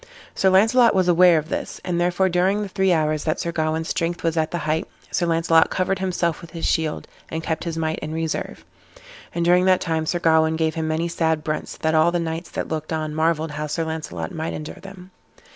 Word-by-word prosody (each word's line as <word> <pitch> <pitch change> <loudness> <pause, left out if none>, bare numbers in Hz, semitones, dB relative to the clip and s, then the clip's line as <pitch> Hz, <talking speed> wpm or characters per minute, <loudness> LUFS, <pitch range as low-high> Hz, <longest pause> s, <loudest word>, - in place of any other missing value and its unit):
Sir 190 - +2
Launcelot 225 +5 +5
was 185 -1 +2
aware 175 -1 +6
of 155 +1 -3
this, - - -4
and 175 -1 -1
therefore, 180 +2 +2
during 190 +3 +1
the - - -4
three 190 0 +1
hours 155 -2 +1
that 155 - 0
Sir 170 - -2
Gawain's 160 0 -1
strength 170 +1 -2
was 165 -1 0
at 160 -1 +1
the 175 - -3
height, 155 0 -1 0.2
Sir 175 - 0
Launcelot 165 -1 +3
covered 185 0 -1
himself 175 -3 -1
with 170 - -11
his 165 0 -5
shield, 160 -1 -1 0.2
and 160 0 -4
kept 160 +1 -3
his 165 -1 -3
might 160 -1 -1
in 155 - -6
reserve. 160 -1 -4 0.7
And 170 0 0
during 180 +1 +4
that 185 -1 +4
time 160 -2 -2
Sir 175 - 0
Gawain 160 -1 +3
gave 160 -1 0
him 160 0 -2
many 160 +2 0
sad 160 -2 0
brunts, 155 -1 -4
that 160 0 0
all 160 +2 +4
the 175 - 0
knights 165 +1 -4
that - - -4
looked 155 0 -4
on 155 -1 -2
marvelled 160 0 0
how 150 +1 -4
Sir 165 +3 -2
Launcelot 160 +3 -5
might 160 -1 -3
endure 155 +5 -7
them. 190 -1 -12
165 Hz, 225 wpm, -22 LUFS, 160-180 Hz, 0.7 s, aware